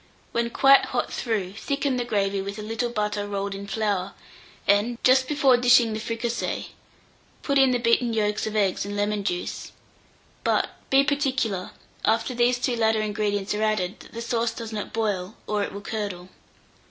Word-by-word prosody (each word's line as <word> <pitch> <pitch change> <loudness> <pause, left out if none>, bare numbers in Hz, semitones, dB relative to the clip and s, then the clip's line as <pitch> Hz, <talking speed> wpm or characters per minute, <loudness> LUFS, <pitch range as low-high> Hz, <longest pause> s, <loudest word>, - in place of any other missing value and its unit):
When 235 0 0
quite 275 +3 +6
hot - - -2
through, 205 -6 -2
thicken 275 +4 -1
the 245 - 0
gravy 200 -4 0
with 200 +2 -5
a 210 - -6
little 225 +3 -2
butter 210 -2 -2
rolled 200 0 -3
in 200 +1 -7
flour, 200 -3 -1 0.5
and, 205 +4 +3
just 260 0 +5
before 275 -4 +4
dishing 245 -2 +5
the 215 - -3
fricassee, 230 +1 -3 0.7
put 280 -1 +2
in 270 -1 +6
the 250 - +2
beaten 235 0 +2
yolks 210 -1 0
of 215 - -4
eggs 200 -3 +1
and 200 +1 -5
lemon 205 0 0
juice; 175 -2 -3 0.7
but - - +1 0.2
be 270 +1 +5
particular, 265 -10 0 0.3
after 225 +3 +1
these 245 +1 +2
two 245 0 0
latter 220 -1 +2
ingredients 205 -1 -1
are 210 - -2
added, 215 -4 0
that - - -15
the 230 0 -5
sauce 230 -1 0
does 230 -1 -6
not 210 -2 -4
boil, 205 -3 -2
or 210 -1 -1
it 200 - -2
will 200 - -7
curdle. 200 -4 -5
220 Hz, 180 wpm, -25 LUFS, 205-240 Hz, 0.7 s, quite